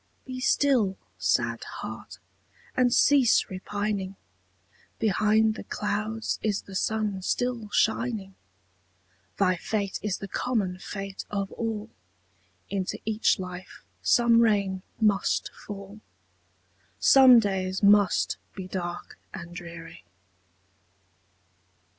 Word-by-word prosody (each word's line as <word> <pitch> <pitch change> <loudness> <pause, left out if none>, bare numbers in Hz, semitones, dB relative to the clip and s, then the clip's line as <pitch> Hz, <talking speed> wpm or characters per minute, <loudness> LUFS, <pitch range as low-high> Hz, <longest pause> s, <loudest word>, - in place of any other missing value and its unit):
Be 255 -1 -6
still, 255 -7 +2 0.2
sad - - +1
heart! - - -8 0.6
and 250 -1 +3
cease 260 -4 +4
repining; 200 0 -3 0.8
Behind 215 +1 +3
the - - -8
clouds 215 +2 -2
is 210 -2 -1
the 195 - -12
sun 210 0 -1
still 240 +2 -1
shining; 220 -3 0 1.0
Thy 185 -2 +3
fate 200 +1 -2
is 205 -3 -2
the 195 - -7
common 195 -5 -1
fate 195 0 -6
of 200 -1 -3
all, 225 -2 -4 0.8
Into 190 -2 -3
each 220 +1 +2
life 180 -1 -8 0.2
some 235 -1 +4
rain 200 -4 +2 0.2
must 210 -3 +1
fall, 205 +1 -10 1.0
Some 260 - +8
days 190 -3 0
must 205 -1 +4 0.2
be 190 -2 -6
dark 175 -2 -5 0.2
and 175 -2 -8
dreary. 170 -1 -9
205 Hz, 100 wpm, -27 LUFS, 190-220 Hz, 1.0 s, Some